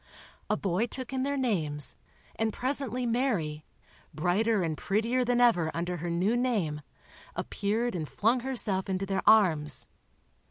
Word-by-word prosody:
A - - +2
boy 195 +4 0
took 260 +2 -6
in 260 - 0
their 280 +1 0
names, 160 - -1 0.4
and 225 0 0
presently 255 0 -1
Mary, 215 - 0 0.5
brighter 190 +6 +2
and 160 -2 -1
prettier 225 +9 0
than 245 0 +1
ever 220 -10 +4
under 175 +1 -2
her 175 +1 -4
new 180 +7 +1
name, 210 -12 0 0.5
appeared 220 +4 -1
and 160 -4 -4
flung 230 +4 +2
herself 215 -7 -1
into 190 +1 -1
their 195 0 -1
arms. 155 - +4
210 Hz, 145 wpm, -29 LUFS, 170-245 Hz, 0.5 s, ever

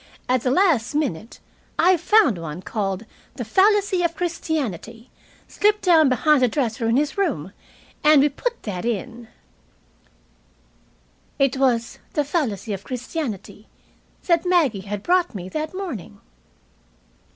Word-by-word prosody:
At 255 -1 +2
the 250 - 0
last 290 - +2
minute 230 - -3 0.4
I 370 +1 +5
found 345 - +3
one 165 +2 -7
called 200 -1 -3 0.3
'The 245 - -5
Fallacy 390 - +3
of 340 -1 0
Christianity' 265 - -4 0.4
slipped 420 0 +1
down 320 -6 +5
behind 280 +3 +3
the 250 - +5
dresser 235 -1 -1
in 230 - +3
his 300 +6 -1
room, 235 - -1 0.5
and 300 -2 +6
we 295 - +3
put 480 - -4
that 185 -5 -4
in." 235 +1 -4 2.1
It 275 -2 +2
was 240 -3 0
"The 295 - +1
Fallacy 240 - -2
of 195 0 -6
Christianity" 250 - -6 0.6
that 340 -2 +2
Maggie 335 - +2
had 205 -1 -4
brought 355 -7 +1
me 185 -1 -6
that 310 - -4
morning. 345 - -6
270 Hz, 130 wpm, -22 LUFS, 225-340 Hz, 2.1 s, and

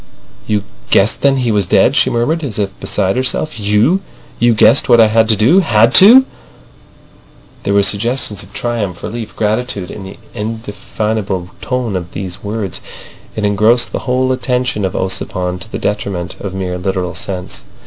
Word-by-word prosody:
"You 105 -2 0 0.3
guessed 100 +3 +3
then 140 -1 +3
he 125 -3 0
was 100 -4 +1
dead," - - +3
she - - +3
murmured, 150 +8 0
as 125 -8 -4
if 100 -2 -1
beside 95 -1 -1
herself. 130 +2 -2
"You! 105 - +2 0.4
You 120 -1 +3
guessed 115 +5 +4
what 120 -1 +6
I 115 - +8
had 110 +1 +3
to 110 - +4
do. 125 - +4
Had 115 - +3
to!" 245 +7 +8 1.4
There 100 - -1
were 100 - +4
suggestions 105 0 0
of 100 - -12
triumph, 100 -4 -3
relief, 110 +1 -6
gratitude 105 -3 -2
in 105 - -8
the 95 +1 -10 0.2
indefinable 105 -3 -4
tone 125 -5 -2
of 90 -1 -5
these 95 -2 -6
words. 105 -3 -4 0.5
It 105 - -1
engrossed 110 +4 +3
the - - -3
whole 130 +1 +1
attention 125 -4 -1
of 95 - -3
Ossipon 90 -1 -1
to 110 +4 -11
the - - -3
detriment 100 -4 -3
of 95 -2 -6
mere 90 -1 -3
literal 90 -1 -2
sense. 90 0 -5
105 Hz, 170 wpm, -15 LUFS, 95-120 Hz, 1.4 s, I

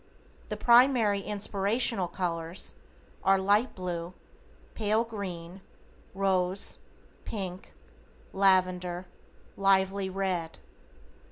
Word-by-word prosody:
The - - -3
primary 235 -4 +5
inspirational 205 +1 0
colors 170 -1 -4 0.5
are: 195 0 +5
Light 205 +6 +2
Blue, 180 -1 -5 0.6
Pale 215 +1 +1
Green, 190 -5 -7 0.5
Rose, 190 0 0 0.4
Pink, 190 -3 -5 0.6
Lavender, 185 -2 +2 0.5
Lively 195 0 +2
Red. 185 -4 -2
195 Hz, 75 wpm, -29 LUFS, 180-205 Hz, 0.6 s, primary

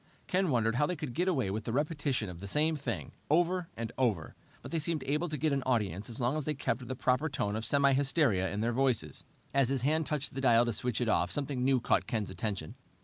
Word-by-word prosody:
Ken 185 -1 +1
wondered 115 -3 +1
how 145 +2 +3
they 180 - -2
could 145 -6 -5
get 180 +6 0
away 130 - +1
with 110 +3 -4
a - - 0
repetition 145 -4 -1
of 90 -2 -8
the 100 - -7
same 155 +9 +2
thing, 115 - -4 0.2
over 175 +2 +2
and 115 -1 -4
over, 110 -11 0 0.3
but - - -8
they 165 - 0
seemed 160 0 -2
able 150 +5 -1
to 155 - -3
get 150 +1 +1
an 135 - +1
audience 110 -6 -1
as 115 - -5
long 125 +3 +1
as 155 -3 -2
they 150 - -1
kept 125 -2 -2
the 130 - -3
proper 130 +5 +1
tone 105 -7 -1
of 110 - -3
semi 140 +2 +4
hysteria 135 - +2
in 105 - -2
their 120 +2 0
voices. 120 - 0 0.3
As 135 -2 +3
his 135 -2 0
hand 155 +2 +1
touched 150 -2 -2
the 135 - -4
dial 120 -2 +5
to 120 - -1
switch 120 +2 -1
it 120 - +1
off, 110 - +2
something 140 -3 -2
new 130 0 +3
caught - - +1
Ken's 110 -5 -2
attention. 100 -9 -4
130 Hz, 250 wpm, -31 LUFS, 115-150 Hz, 0.3 s, dial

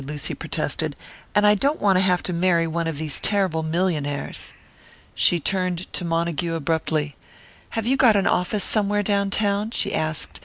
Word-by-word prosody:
Lucy 145 +1 -3
protested. - - -2 0.4
"And 210 - +4
I 210 - +7
don't 280 +9 +1
want 200 -2 +3
to - - +3
have 180 -1 +2
to 180 - -2
marry 170 -1 +2
one 165 0 -2
of 160 -3 -3
these 155 -1 -1
terrible 190 -6 +1
millionaires." 160 -3 -2 0.6
She 175 - +3
turned 185 +1 -2
to - - -2
Montague 170 0 -1
abruptly. 155 -1 -1 0.6
"Have 225 - -1
you 265 +3 +2
got 245 -5 +5
an 195 -1 +2
office 180 +3 +1
somewhere 205 -1 +1
down 200 -1 +1
town?" 205 +1 0
she - - -1
asked. 155 -1 -2
180 Hz, 170 wpm, -23 LUFS, 160-200 Hz, 0.6 s, I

